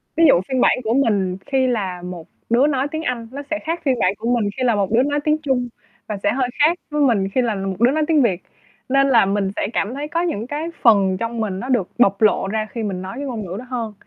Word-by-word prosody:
Ví 330 - +3
dụ, 175 - +5
phiên 260 -2 0
bản - - +4
của 220 +1 0
mình 200 -8 +1
khi 265 -2 +1
là 190 -7 -2
một 180 -2 -8 0.2
đứa 250 +5 +4
nói 275 -1 0
tiếng 315 0 -4
Anh, 235 -4 -3
nó 280 +2 -6
sẽ 310 - 0
khác 330 +2 -3
phiên 255 -3 +1
bản 185 +2 +2
của 230 +2 -3
mình 205 -2 0
khi 255 - -1
là 235 -3 +3
một 200 0 -1
đứa 240 +3 +4
nói 290 +1 0
tiếng 305 0 +2
Trung 255 -3 0 0.4
và 210 -2 -3
sẽ 205 - +3
hơi 255 -1 0
khác 325 +4 +4
với 300 0 0
mình 210 -8 +2
khi 255 +6 +1
là 225 -4 0
một 195 -1 -3
đứa 240 +3 +4
nói 310 +1 +1
tiếng 310 -3 +4
Việt. 190 -7 +1 0.5
Nên 275 +1 +3
là 230 -6 +5
mình 195 0 0
sẽ - - -1
cảm 210 +5 -1
thấy 290 +2 -4
có 335 +1 -1
những 240 -10 -2
cái 300 +4 -3
phần 195 -5 +4
trong 230 +1 -4
mình 195 -4 -2
nó 255 - -6
được 230 -8 +1
bộc 200 -3 +3
lộ 210 -2 +3
ra 215 +1 -2
khi 230 -2 -4
mình 190 -3 -3
nói 190 +2 -6
cái 285 - -4
ngôn 225 -6 -4
ngữ 180 +1 -6
đó 255 - -9
hơn. 225 -5 -5
235 Hz, 275 wpm, -20 LUFS, 200-275 Hz, 0.5 s, dụ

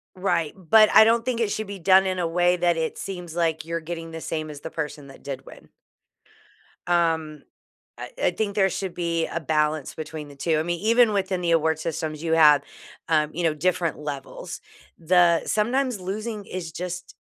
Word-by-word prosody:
Right, 175 -5 0
but 210 +4 +5
I 220 - +9
don't 230 +1 +3
think 245 -2 -1
it 215 -3 +1
should 215 0 -3
be 200 -1 -7
done 190 +2 +5
in 185 -1 -1
a 170 - 0
way 175 +1 +2
that 175 -1 +1
it 160 -1 -2
seems 180 -3 -7
like 160 -2 0
you're 165 0 -3
getting 165 0 -6
the 165 0 -7
same 155 -1 -4
as 145 -1 -9
the 160 - -7
person 150 -2 -5
that 135 - -14
did 135 -2 -7
win. - - -14 1.2
Um, 160 -4 0 0.6
I - - -7
I - - +4
think 205 -2 -2
there 195 -2 +3
should 190 -3 -4
be 170 -2 -1
a 170 - -4
balance 150 -1 0
between 155 -1 -7
the 140 - -13
2, 155 +2 0
I - - +1
mean, 175 0 -3
even 230 +1 +4
within 190 -2 -1
the 170 - 0
award 160 -1 +2
systems, 155 -1 -4
you 165 -1 -1
have, 150 -3 +6 0.5
uh, 155 -2 +2
you 175 - -3
know, 155 -2 +2
different 170 0 0
levels. 145 -2 -7 0.4
The 170 0 +4
sometimes 240 0 0
losing 210 +3 -5
is 170 -3 -6
just 180 +1 -6
170 Hz, 200 wpm, -24 LUFS, 155-190 Hz, 1.2 s, I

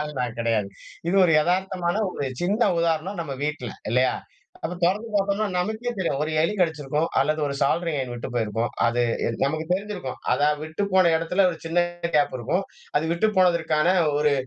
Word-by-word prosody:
ஆள் 150 0 -3
நான் 120 -2 -2
கிடையாது. 115 -3 +1 0.4
இது 185 - +2
ஒரு 165 - +3
எதார்த்தமான 180 +1 0 0.2
ஒரு 140 - -3 0.2
சின்ன 205 +6 +1 0.2
உதாரணம் 170 +3 0
நம்ம 145 -4 -4
வீட்ல. 150 -6 -3 0.2
இல்லயா? 125 +2 +3 0.5
அத 180 - -3
தொறந்து 205 +6 +1
பார்த்தோம்னா 200 +1 +1
நமக்கே 220 +6 -2
தெரியும். 165 -7 0
ஒரு 155 - -1
எலி 170 - +1
கடிச்சிருக்கும் 155 -2 0
அல்லது 155 +3 +1
ஒரு 140 - -3
சாலரி 165 +4 +1
ஐயன் 130 -2 -3
விட்டு 120 +2 -5
போயிருக்கும். 115 0 -1 0.2
அது 120 +1 +1 0.2
என் 115 - -2
நமக்கு 155 +3 -1
தெரிஞ்சிருக்கும். 195 -9 -3
அதா 145 - +3
விட்டு 155 +5 -4
போன 185 -3 +5
இடத்துல 180 +4 +2
ஒரு 165 - -6
சின்ன 165 +2 +2 0.3
கேப் 145 -3 +2
இருக்கும். 180 - -1 0.3
அது 150 - +2
விட்டு 170 +6 +2
போனதற்கான 170 -2 +3 0.2
ஒரு 150 -1 +3
160 Hz, 175 wpm, -24 LUFS, 140-185 Hz, 0.5 s, போன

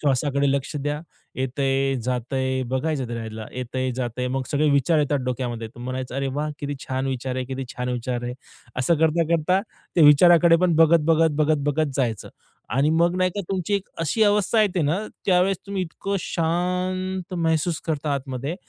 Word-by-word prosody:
श्वासाकडे 140 0 +1
लक्ष 140 +1 -2
द्या. 145 +1 -2 0.4
येतय, 135 +1 0
जातंय 130 +2 -1
बघायचं 130 +1 -1
त्याला, 110 -2 -6
येतय, 130 +1 -3
जातंय. 125 0 -2
मग 135 +1 -1
सगळे 150 +1 +2
विचार 140 +3 +3
येतात 145 -1 +1
डोक्यामध्ये, 120 -3 -3
तुम्ही 120 +2 -11
म्हणायचं, 130 0 -4
"अरे 135 0 -1
वाह! 150 +1 -1
किती 145 0 -3
छान 130 0 -2
विचार 130 -1 -3
आहे, 130 - -2
किती 135 0 -4
छान 125 0 -3
विचार 125 0 -3
आहे." 120 - -3 0.5
असं 150 +7 +3
करता, 160 +1 +3
करता 170 +3 +2 0.4
ते 170 - +6
विचाराकडे 165 +2 +7
पण 175 -2 +3
बघत, 165 +1 +6
बघत, 165 0 +4
बघत, 155 0 +3
बघत 145 -1 0
जायचं 115 -6 -1 0.5
आणि 145 +3 +3
मग 170 +2 +2
नाही 185 0 +2
का 205 - -2
तुमची 190 +1 -1
एक 200 0 -2
अशी 165 +8 +1
अवस्था 210 +1 +3
येते 185 -4 +1
ना, 155 +6 +1 0.3
त्यावेळेस 185 0 +3
तुम्ही 200 -1 -2
इतकं 195 +3 -3
शांत 180 +2 -2
महसूस 165 -1 0
करता 150 -2 -1
आतमध्ये 135 +3 -4
145 Hz, 175 wpm, -23 LUFS, 130-170 Hz, 0.5 s, विचाराकडे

